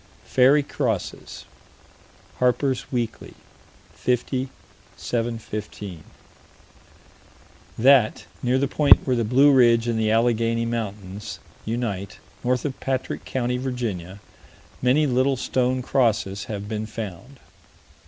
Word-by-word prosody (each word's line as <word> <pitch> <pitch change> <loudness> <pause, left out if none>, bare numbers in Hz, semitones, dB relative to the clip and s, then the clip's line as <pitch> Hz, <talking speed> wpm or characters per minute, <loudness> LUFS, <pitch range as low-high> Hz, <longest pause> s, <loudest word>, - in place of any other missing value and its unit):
"Fairy 135 +3 +4
crosses." 120 -8 -3 0.9
Harper's 125 +1 +1
Weekly, 120 -3 -3 0.6
50 125 +1 -1 0.5
715: 110 -6 -4 1.7
That, 125 -2 +4 0.2
near 125 +1 +2
the 140 +1 +1
point 145 +1 +5
where 130 - +1
the 120 - +1
Blue 135 +6 +5
Ridge 120 -3 +5
and 115 -1 0
the 110 -1 +1
Allegheny 115 0 +2
Mountains 105 -4 -5 0.3
unite, 105 -4 -3 0.3
north 125 +1 0
of 140 -2 -3
Patrick 130 -1 -3
County, 125 -1 -1
Virginia, 110 -8 -4 0.6
many 130 +5 +3
little 130 0 +2
stone 125 +1 0
crosses 110 -7 +1
have 105 -2 -5
been 110 0 -3
found. 115 +4 -7
120 Hz, 105 wpm, -24 LUFS, 110-130 Hz, 1.7 s, point